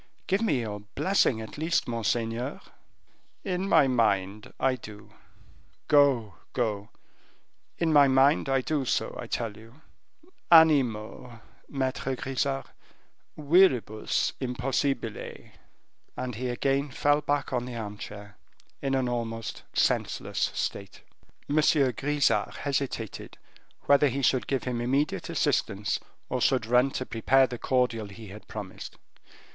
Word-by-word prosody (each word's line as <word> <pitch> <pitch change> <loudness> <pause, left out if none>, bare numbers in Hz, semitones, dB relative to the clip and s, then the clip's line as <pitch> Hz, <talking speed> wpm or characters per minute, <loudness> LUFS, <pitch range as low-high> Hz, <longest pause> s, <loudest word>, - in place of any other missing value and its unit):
"Give 195 +2 +1
me 145 - +1
your 105 -2 -5
blessing, 110 - +1
at 110 +6 -9
least, 165 +2 0
monseigneur." 115 +2 -2 0.8
"In 190 0 -2
my 160 -6 +5
mind, 105 -5 0
I 135 -1 +2
do; 105 -4 -12 0.7
go, 135 - +3 0.2
go; 105 -4 -2 0.9
in 165 -2 +1
my 145 -1 +7
mind, 135 +2 +3
I 135 -1 +2
do 145 +1 -1
so, 130 - -1
I - - -6
tell 115 -3 -3
you 115 +7 -16 0.7
animo, 125 -7 +4 0.3
Maitre 135 -1 -2
Grisart, 135 +1 -2 0.7
viribus 145 - +2
impossibile." 125 -2 -3 0.7
And 125 -1 -3
he 125 +3 -3
again 135 +3 0
fell 145 +3 +2
back 145 -2 -1
on 125 -1 -1
the 125 -1 -7
armchair, 105 -2 -8 0.4
in 135 -1 0
an 130 -1 +1
almost 115 -2 -4
senseless - - 0
state. 100 -1 -4 0.5
M. 145 - -1
Grisart 145 -1 +2
hesitated, 135 -6 -4 0.4
whether 140 +1 +4
he 135 +1 -2
should 130 0 +2
give 135 -2 -1
him 125 -2 -2
immediate 135 +5 0
assistance, 100 +1 0 0.3
or 125 0 -2
should 130 -4 +2
run 125 +3 +3
to 130 - -4
prepare 130 +4 +3
the 120 -2 -7
cordial 125 -4 0
he 105 +1 -11
had 105 +3 -12
promised. 100 -3 -8
125 Hz, 125 wpm, -27 LUFS, 115-140 Hz, 0.9 s, my